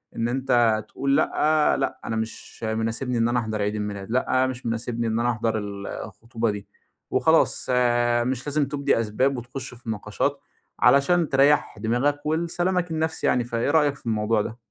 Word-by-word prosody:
إن 115 - 0
أنت 120 -4 +2
تقول 140 +1 0
لأ، 155 0 +2
لأ - - -2
أنا 110 - -2
مش 110 +1 -6
مناسبني 115 +3 -1
إن 115 0 +2
أنا 120 +1 +1
أحضَر 110 -2 -3
عيد 105 +1 -1
الميلاد، 105 -1 -4
لأ 130 +1 +2
مش 130 -1 -6
مناسبني 115 0 -2
إن 110 +1 0
أنا 120 +1 +2
أحضر 115 -1 -1
ال 100 -1 -5
الخطوبة 115 +2 -4
دي. 105 -1 -7 0.4
وخلاص - - +3
آآ، 120 -1 +2
مش 130 +2 -3
لازم 145 0 +1
تُبدي 140 -2 +1
أسباب، 125 +5 0
وتخش 125 +1 -7
في 120 -1 -10
نقاشات، 110 -3 -2 0.4
علشان 155 +4 +4
تريّح 140 -4 +3
دماغك 125 +7 0
ولسلامَك 170 +3 0
النفسي 160 0 -1
يعني، 125 - +2
فإيه 120 +3 -1
رأيك 150 -3 +3
في 145 - -20
الموضوع 110 -1 +1
ده؟ 110 +2 -6
120 Hz, 170 wpm, -24 LUFS, 110-140 Hz, 0.4 s, علشان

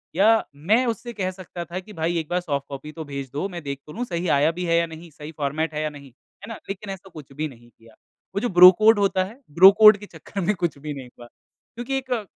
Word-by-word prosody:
या 220 +4 +4
मैं 210 - +2
उससे 235 +1 -4
कह 185 -3 -2
सकता 180 -2 -8
था 180 +2 -5
कि 210 +3 -13
भाई 165 +1 -1
एक 160 - -6
बार 180 +1 0
सॉफ्ट 140 -5 -3
कॉपी 140 +2 -8
तो 160 0 -8
भेज 140 -2 -6
दो 150 +7 -2
मैं 175 -2 -7
देख 140 -1 -5
तो 150 - -10
लूँ 245 +5 -3
सही 175 -4 -3
आया 155 +3 +3
भी 180 +1 -5
है 170 0 +2
या 170 - +2
नहीं, 160 +1 -11
सही 150 +1 -10
फ़ॉर्मेट 155 +2 -2
है 150 - -2
या 155 - -1
नहीं। 140 -2 -13
है 170 - -18
ना। 225 - -5
लेकिन 200 +1 -6
ऐसा 190 0 -12
कुछ 150 -5 -12
भी 155 +3 -3
नहीं 120 -4 -16
किया। 115 -1 -21 0.4
वो - - +1
जो 245 - -1
ब्रो 180 0 +9
कोड 215 -1 +5
होता 195 -2 +2
है, 225 +7 -12 0.2
ब्रो 190 +2 +10
कोड 215 -1 +9
के 205 - -11
चक्कर 190 +2 -8
में 205 +4 +1
कुछ 170 -5 -2
भी 150 0 -5
नहीं 130 -3 -9
हुआ। 120 0 -15
क्योंकि 240 - -8
एक 260 -1 -7
अ, 230 -4 -1
170 Hz, 270 wpm, -23 LUFS, 150-200 Hz, 0.4 s, ब्रो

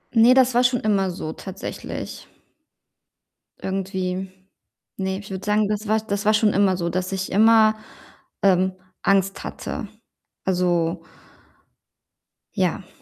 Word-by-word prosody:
Ne, 230 +3 +7
das 255 -1 +4
war 245 +1 +4
schon 245 0 +3
immer 195 -4 +1
so 160 -3 -5
tatsächlich 190 +1 -7 1.3
irgendwie. 190 -1 -3 0.7
Ne, 190 0 -2
ich 200 - -11
würde 190 +1 -5
sagen, 210 0 +2
das 210 0 -3
war 220 +1 +3
das 205 -1 -3
war 215 - +5
schon 215 -1 +3
immer 195 -1 +3
so, 170 -1 -1
dass 185 +1 -2
ich 190 0 -3
immer, 220 +1 +5 0.7
ähm, 190 -1 +3 0.3
Angst 195 0 +2
hatte. 215 - -5 0.6
Also 175 -2 +1 1.6
ja. 185 -1 -1
195 Hz, 125 wpm, -23 LUFS, 185-215 Hz, 1.6 s, Ne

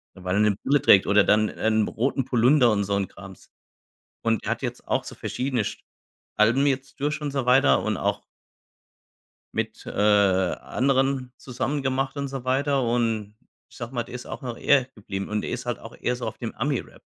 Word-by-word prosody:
weil 90 0 -3
er 105 - +2
'ne 105 -1 +3
Brille 145 0 +3
trägt 95 - +6
oder 100 0 +5
dann 105 +1 +3
'n 110 -1 +1
roten 130 +2 -1
Pullunder 125 0 +4
und 100 -1 +1
so 100 0 -1
'n 100 -1 0
Krams. - - -13 0.7
Und 115 -2 0
er - - -2
hat - - -2
jetzt - - -5
auch - - 0
so - - -8
verschiedene 125 -4 -2
sch 110 - -5 0.6
Alben 120 +6 +4
jetzt 135 -1 -2
durch 150 +2 -1
und 150 - -3
so 135 -2 -2
weiter 125 - +4
und - - -1
auch - - -1 1.3
mit, - - -4
äh, - - -6
anderen 120 +7 +1
zusammen 135 +3 -3
gemacht 135 +1 -1
und 140 -1 -3
so 135 -2 -6
weiter. 135 +1 +1
Und 115 -3 -1 0.3
ich - - -18
sage 120 +2 -7
mal, 120 - -1
der 125 - -10
ist 125 - -7
auch - - -7
noch 120 -3 -5
er 140 -3 +3
geblieben 100 -2 -5
und 105 0 -1
er - - -4
ist 125 0 -4
halt 120 - -3
auch 115 - -11
eher 125 - 0
so 120 - -6
auf 110 - -6
dem 115 -3 -5
Ami-Rap. 135 0 -3
120 Hz, 205 wpm, -25 LUFS, 105-135 Hz, 1.3 s, trägt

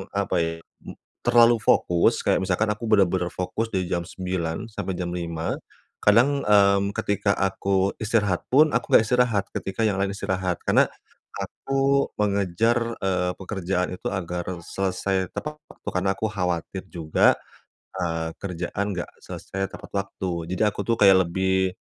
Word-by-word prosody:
apa 100 -1 0
ya, 80 0 0 0.4
m - - -8 0.3
terlalu 120 -1 +5
fokus, 85 -5 +3
kayak - - +3
misalkan 95 +3 +1
aku 115 +2 -6
benar-benar 95 -4 +3
fokus 95 +6 -3
dari 95 -1 0
jam 85 - +1
9, 90 0 -3
sampai 95 -3 -4
jam 85 -1 -3
5. 85 -2 -3 0.5
Kadang, 140 +1 +3
mmm, 100 -1 +4
ketika 100 0 0
aku 95 0 +1
istirahat 105 -4 0
pun, 150 +4 +5
aku 125 - 0
enggak - - +7
istirahat, 115 -3 +2
ketika 100 +4 -3
yang 100 -2 +1
lain 100 0 +1
istirahat. 95 -3 -2
Karena, - - +4 0.4
aku 135 0 0
mengejar, 105 +4 +1
eee, 90 -2 0
pekerjaan 90 -1 -2
itu - - -4
agar 90 -2 -3 0.2
selesai 95 0 -2
tepat 150 0 -5 0.2
waktu - - -24
karena 95 +1 +2
aku 110 +3 -2
khawatir 95 -2 -3
juga, 80 -3 +2 0.6
eee, 80 -2 -2
kerjaan 95 +2 -3
enggak 90 -2 -4 0.2
selesai 95 0 -4
tepat - - -10
waktu. 100 -1 -3 0.2
Jadi 95 - -3
aku 105 - -5
tuh 115 - +2
kayak 95 -2 +7
lebih, 95 +1 0
95 Hz, 150 wpm, -24 LUFS, 90-105 Hz, 0.6 s, enggak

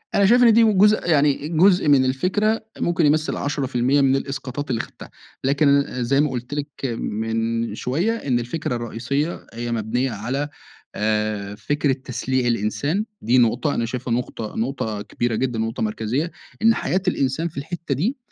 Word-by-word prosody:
أنا 200 - +5
شايف 245 +5 +6
إن 230 -2 +7
دي 230 +1 +6
من 215 -3 +3
جزء 210 -2 +4
يعني 145 -2 +3
جزء 180 +1 +4
من 140 -3 +5
الفكرة 205 +12 0
ممكن 175 -1 +1
يُمَثِّل 155 +1 +2
10% 135 -1 +1
من 135 -1 +4
الإسقاطات 135 0 -4
اللي 120 -3 0
خَدْتِهَا - - -12 0.3
لكن 140 +1 +4
ل 125 -3 -3
زي 135 +4 +3
ما 150 - +1
قلت 125 +1 -5
لِك 145 -1 -5
من 115 +2 -2
شويّة، 170 - 0
إن 130 - 0
الفكرة 120 +2 -3
الرئيسية 125 +7 -3
هي 120 +1 -4
مبنية 115 +3 -1
على 125 +7 -3 0.5
آآ، 105 -1 -1
فكرة 145 +6 0
تسليع 130 0 -2
الإنسان، 130 - 0 0.2
دي 120 +4 +3
نقطة، 125 +5 +2
أنا 115 - 0
شايفها 125 +1 -3
نقطة 115 -2 -4
نقطة 110 -3 -2
كبيرة 120 +2 -2
جدًا 120 -2 -1
ونقطة 115 0 -3
مركزية؛ 120 +10 -2 0.3
إن 225 +1 +6
حياة 185 - 0
الإنسان 140 -1 0
في 165 - -11
الحتّة 160 +1 -3
دي 215 - -1
135 Hz, 165 wpm, -22 LUFS, 120-155 Hz, 0.5 s, إن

